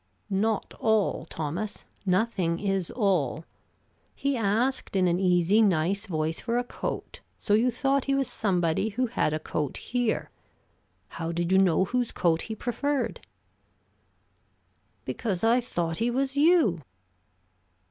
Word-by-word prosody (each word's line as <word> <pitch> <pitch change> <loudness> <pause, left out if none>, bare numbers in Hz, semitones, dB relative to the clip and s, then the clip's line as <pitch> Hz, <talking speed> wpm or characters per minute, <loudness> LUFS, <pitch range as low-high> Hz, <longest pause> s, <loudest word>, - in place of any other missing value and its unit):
"Not 215 +2 0
all, 220 -6 +1
Thomas: 165 +7 -4 0.2
nothing 185 -3 +1
is 195 -3 -1
all. 175 - 0 0.7
He 280 0 0
asked 230 +3 0
in 185 -1 +3
an 175 +1 +1
easy, 180 +3 +3
nice 195 +2 +1
voice 160 -2 -1
for 235 +1 -1
a 245 - +1
coat, 245 - -5 0.2
so 205 - -1
you 230 +4 +4
thought 270 +3 0
he 275 - +1
was 275 -2 +1
somebody 180 -1 0
who 245 +5 0
had 230 -9 0
a 155 - 0
coat 150 -2 -3
here. 245 -3 -1 0.8
How 165 0 -4
did 170 +1 -1
you 190 - +5
know 185 -1 +3
whose 245 +3 -1
coat 165 -2 +1
he 220 - -5
preferred?" 265 +5 -2 1.9
"Because 200 -5 -3
I 235 +2 +4
thought 170 -8 -3
he 230 +2 +1
was 265 +2 -1
you." 290 - +4
205 Hz, 135 wpm, -27 LUFS, 175-240 Hz, 1.9 s, you